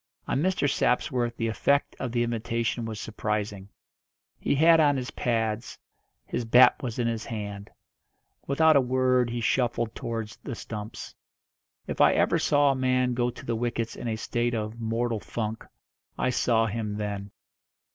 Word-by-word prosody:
On 135 Hz, -, 0 dB
Mr. 185 Hz, -4 st, +1 dB
Sapsworth 125 Hz, -3 st, 0 dB
the 115 Hz, -, -1 dB
effect 140 Hz, +6 st, +1 dB
of 130 Hz, -, -3 dB
the 120 Hz, 0 st, +1 dB
invitation 115 Hz, 0 st, -2 dB
was 110 Hz, -2 st, -5 dB
surprising. 105 Hz, -2 st, -3 dB, 0.7 s
He -, -, 0 dB
had 165 Hz, +3 st, +6 dB
on 145 Hz, -3 st, +4 dB
his 125 Hz, -1 st, -4 dB
pads, 115 Hz, -1 st, -2 dB, 0.5 s
his -, -, -3 dB
bat 125 Hz, +4 st, +6 dB
was 120 Hz, -5 st, -4 dB
in 120 Hz, -, 0 dB
his 115 Hz, -1 st, -2 dB
hand. 100 Hz, -2 st, -6 dB, 0.8 s
Without 160 Hz, +3 st, +4 dB
a 140 Hz, -, +6 dB
word 130 Hz, -1 st, +2 dB
he 120 Hz, 0 st, -3 dB
shuffled 120 Hz, -1 st, 0 dB
towards 115 Hz, -1 st, -5 dB
the 130 Hz, -, -7 dB
stumps. 105 Hz, -1 st, -7 dB, 0.7 s
If -, -, -2 dB
ever -, -, +4 dB
I -, -, -1 dB
saw 145 Hz, -1 st, +3 dB
a -, -, -1 dB
man 130 Hz, -1 st, +1 dB
go 120 Hz, 0 st, +1 dB
to 120 Hz, -, -10 dB
the 115 Hz, -, -1 dB
wickets 115 Hz, 0 st, -2 dB
in -, -, -6 dB
a 110 Hz, -, -1 dB
state 120 Hz, +2 st, -1 dB
of 110 Hz, +1 st, -4 dB
"mortal 115 Hz, 0 st, -1 dB
funk," 110 Hz, +1 st, -4 dB, 0.5 s
I 130 Hz, -, +1 dB
saw 115 Hz, -2 st, +2 dB
him 105 Hz, -1 st, -3 dB
then. 100 Hz, -1 st, -4 dB
115 Hz, 165 wpm, -27 LUFS, 110-125 Hz, 0.8 s, had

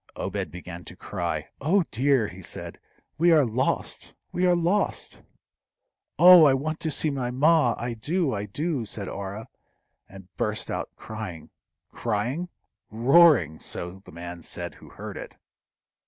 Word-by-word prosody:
Obed -, -, -3 dB
began 90 Hz, -1 st, -9 dB
to -, -, -10 dB
cry. 85 Hz, -5 st, -4 dB
"Oh 175 Hz, +7 st, +3 dB
dear!" 130 Hz, -1 st, +2 dB
he 90 Hz, +1 st, -10 dB
said; -, -, -7 dB, 0.4 s
"we 170 Hz, +1 st, +5 dB
are 155 Hz, -4 st, +6 dB
lost! 120 Hz, +3 st, -2 dB, 0.2 s
we 180 Hz, +1 st, +1 dB
are 180 Hz, -, +4 dB
lost!" 175 Hz, +4 st, -1 dB, 1.0 s
"Oh, 180 Hz, -2 st, +9 dB
I 135 Hz, -2 st, +5 dB
want 155 Hz, +4 st, -3 dB
to 160 Hz, -, -2 dB
see 155 Hz, +1 st, 0 dB
my 130 Hz, -3 st, -2 dB
ma! 135 Hz, -1 st, +3 dB
I 120 Hz, 0 st, -3 dB
do! 150 Hz, +6 st, -1 dB
I 105 Hz, 0 st, -3 dB
do!" 145 Hz, -, -2 dB
said 100 Hz, -2 st, -6 dB
Orah, 100 Hz, +3 st, -6 dB, 0.6 s
and 95 Hz, -2 st, -14 dB
burst -, -, -2 dB
out -, -, -3 dB
crying. 110 Hz, -7 st, -8 dB, 0.4 s
Crying? 120 Hz, +10 st, -2 dB, 0.4 s
roaring! 115 Hz, -, +5 dB
so 90 Hz, +2 st, -5 dB
the -, -, -14 dB
man 85 Hz, +1 st, -8 dB
said -, -, -6 dB
who -, -, -15 dB
heard -, -, -8 dB
it. -, -, -9 dB
120 Hz, 150 wpm, -26 LUFS, 95-155 Hz, 1.0 s, Oh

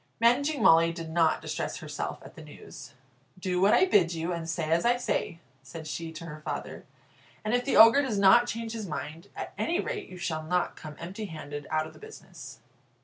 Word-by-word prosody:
Managing 275 Hz, +6 st, +2 dB
Molly 165 Hz, +1 st, +6 dB
did 165 Hz, -1 st, -7 dB
not 165 Hz, -1 st, +2 dB
distress -, -, -3 dB
herself -, -, -5 dB
at -, -, -12 dB
the -, -, -12 dB
news. 145 Hz, -2 st, -12 dB, 0.4 s
"Do 180 Hz, -1 st, -1 dB
what 200 Hz, +2 st, +5 dB
I 375 Hz, -, +5 dB
bid 180 Hz, -, +3 dB
you, 165 Hz, +2 st, -2 dB
and 165 Hz, -1 st, -5 dB
say 160 Hz, -1 st, -2 dB
as 170 Hz, +1 st, +3 dB
I 240 Hz, +1 st, +3 dB
say," 175 Hz, -8 st, -2 dB, 0.2 s
said 165 Hz, -2 st, -10 dB
she 160 Hz, +1 st, -5 dB
to 165 Hz, +1 st, -8 dB
her 155 Hz, -1 st, -9 dB
father, -, -, -6 dB, 0.6 s
"and 215 Hz, -, 0 dB
if 245 Hz, 0 st, +2 dB
the 275 Hz, -, +1 dB
Ogre 230 Hz, +5 st, +8 dB
does 255 Hz, -7 st, -2 dB
not 200 Hz, +5 st, +6 dB
change 230 Hz, -1 st, -4 dB
his 220 Hz, -3 st, -5 dB
mind, 160 Hz, +3 st, -6 dB
at -, -, -6 dB
any 345 Hz, +3 st, 0 dB
rate 415 Hz, -, -4 dB
you 185 Hz, -, -10 dB
shall 160 Hz, -3 st, -3 dB
not 180 Hz, +3 st, -1 dB
come 150 Hz, -1 st, -10 dB
empty 190 Hz, +6 st, -6 dB
handed 145 Hz, -5 st, -7 dB
out 155 Hz, 0 st, 0 dB
of 160 Hz, -, -11 dB
the -, -, -16 dB
business." 440 Hz, 0 st, -12 dB
175 Hz, 210 wpm, -28 LUFS, 160-230 Hz, 0.6 s, Ogre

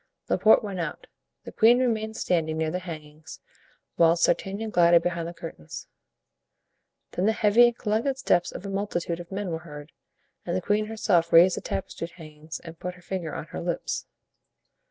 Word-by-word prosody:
Laporte 220 Hz, -, +5 dB
went 195 Hz, -3 st, -5 dB
out; 170 Hz, -, -4 dB, 0.4 s
the -, -, -9 dB
queen 235 Hz, +2 st, +5 dB
remained 220 Hz, -3 st, -1 dB
standing 160 Hz, -3 st, 0 dB
near 160 Hz, 0 st, 0 dB
the 180 Hz, -, -2 dB
hangings, 155 Hz, -3 st, -10 dB, 0.6 s
whilst 170 Hz, 0 st, +5 dB
D'Artagnan 200 Hz, +5 st, -1 dB
glided 170 Hz, -2 st, +5 dB
behind 170 Hz, -1 st, -2 dB
the -, -, -5 dB
curtains. 160 Hz, -, -8 dB, 1.3 s
Then 185 Hz, +3 st, 0 dB
the -, -, +5 dB
heavy 220 Hz, +2 st, +5 dB
and 240 Hz, 0 st, -2 dB
collected 230 Hz, +5 st, 0 dB
steps 175 Hz, -9 st, +1 dB
of -, -, -8 dB
a -, -, -4 dB
multitude 175 Hz, -4 st, -2 dB
of 175 Hz, +1 st, -10 dB
men 195 Hz, -2 st, -3 dB
were 160 Hz, -, -3 dB
heard, 150 Hz, -2 st, -11 dB, 0.5 s
and 175 Hz, -, -3 dB
the -, -, +1 dB
queen 210 Hz, +3 st, 0 dB
herself 175 Hz, -6 st, +1 dB
raised 175 Hz, +2 st, +7 dB
the -, -, -5 dB
tapestry 165 Hz, -3 st, -4 dB
hangings 155 Hz, -3 st, -10 dB
and 165 Hz, -1 st, -11 dB
put 180 Hz, 0 st, -5 dB
her 180 Hz, -, -17 dB
finger 180 Hz, -4 st, -4 dB
on -, -, -5 dB
her -, -, -4 dB
lips. 175 Hz, 0 st, -3 dB
175 Hz, 175 wpm, -26 LUFS, 165-210 Hz, 1.3 s, raised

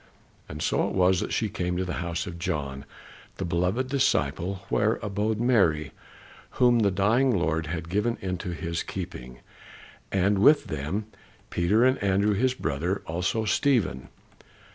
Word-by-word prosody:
And 75 Hz, +1 st, -5 dB
so -, -, +1 dB
it -, -, -4 dB
was 95 Hz, -1 st, +4 dB
that -, -, -3 dB
she 110 Hz, -, 0 dB
came 90 Hz, -4 st, -2 dB
to 95 Hz, -, -1 dB
the 90 Hz, -2 st, -3 dB
house 85 Hz, -1 st, -3 dB
of 85 Hz, -2 st, -7 dB
John, 70 Hz, -6 st, -3 dB, 0.5 s
the 95 Hz, -, -3 dB
beloved 90 Hz, +9 st, 0 dB
disciple, 95 Hz, -, 0 dB
where 110 Hz, +2 st, +2 dB
abode 105 Hz, +1 st, -1 dB
Mary, 85 Hz, -, +2 dB, 0.7 s
whom 120 Hz, -1 st, +5 dB
the 105 Hz, -3 st, +3 dB
dying 110 Hz, +6 st, +2 dB
Lord 80 Hz, -2 st, 0 dB
had 80 Hz, +1 st, -4 dB
given 105 Hz, +6 st, 0 dB
into 90 Hz, -1 st, -4 dB
his 85 Hz, -1 st, -3 dB
keeping, 65 Hz, -10 st, -7 dB, 0.7 s
and 100 Hz, +1 st, +2 dB
with 145 Hz, +8 st, +5 dB
them 75 Hz, +9 st, -3 dB, 0.5 s
Peter, 100 Hz, +8 st, +3 dB
and 130 Hz, +1 st, +2 dB
Andrew 100 Hz, +1 st, +2 dB
his 130 Hz, +5 st, +1 dB
brother, 85 Hz, -, -2 dB
also 90 Hz, +7 st, -1 dB
Stephen. 110 Hz, -, +1 dB
95 Hz, 150 wpm, -26 LUFS, 85-110 Hz, 0.7 s, whom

